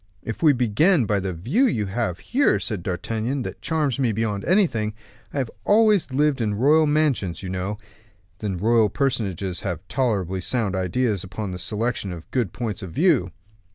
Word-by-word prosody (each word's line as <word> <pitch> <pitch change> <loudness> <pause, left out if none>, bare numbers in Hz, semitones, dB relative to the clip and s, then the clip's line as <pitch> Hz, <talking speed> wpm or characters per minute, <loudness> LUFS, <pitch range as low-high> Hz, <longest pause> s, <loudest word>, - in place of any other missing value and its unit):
"If 115 - -5
we 155 -3 +6
begin 130 - +3
by 105 -1 +1
the 95 0 -3
view 130 - +1
you 110 - 0
have 100 -3 -2
here," 275 - +2
said 105 -6 -3
D'Artagnan, 115 +9 -2
"that - - -7
charms 150 -4 0
me 125 -4 +2
beyond 105 -2 -2
everything; 115 - +2 0.4
I - - -6
have 130 -4 -1
always 210 -6 +4
lived 140 0 +1
in 105 -2 0
royal 150 +7 +4
mansions, 135 - 0
you 95 - -4
know, 95 +3 -3 0.6
and 100 -4 -3
royal 110 +1 +3
personages 100 - -1
have 90 -3 -4
tolerably 100 -8 -1
sound 105 -1 0
ideas 100 +2 0
upon 95 +2 -5
the 90 - -6
selection 105 +1 -2
of 85 -2 -8 0.3
points 110 -1 -4
of 95 - -6
view." 140 - +2
110 Hz, 170 wpm, -23 LUFS, 95-140 Hz, 0.6 s, we